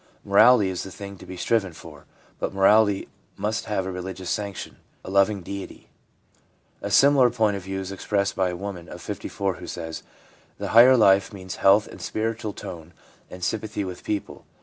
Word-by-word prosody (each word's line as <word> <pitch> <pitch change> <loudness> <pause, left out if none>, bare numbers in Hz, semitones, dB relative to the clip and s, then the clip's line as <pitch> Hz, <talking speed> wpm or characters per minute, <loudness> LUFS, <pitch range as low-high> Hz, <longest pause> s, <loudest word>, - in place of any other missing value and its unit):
Morality 100 +1 +6
is 95 - -3
the - - -7
thing 100 +1 -9
to - - -14
be 95 - -8
striven 100 -3 0
for; 75 -2 -13 0.3
but - - -2
morality 100 +1 +4 0.3
must 105 +3 -2
have 105 -3 -2
a 95 - -3
religious 90 0 -5
sanction, 100 -2 -4 0.3
a - - -6
loving 100 0 +2
Deity/ 100 +2 -8 0.9
A - - -4
similar 140 -3 +5
point 110 -4 +1
of 100 - -5
view 95 +1 -5
is 95 0 -5
expressed 100 0 -1
by 95 -1 +1
a 90 - -4
woman 90 -2 -7
of - - -9
54, 95 -2 -4
who - - -9
says: 80 -1 -6 0.6
'The - - -4
higher 125 +3 +7
life 100 -3 +4
means 95 -3 -8
health 100 +2 +5
and - - -12
spiritual 110 0 -3
tone 85 -2 -9 0.3
and 90 0 -10
sympathy 105 +1 -2
with 90 -2 -7
people. 105 -2 -4
100 Hz, 180 wpm, -24 LUFS, 95-105 Hz, 0.9 s, higher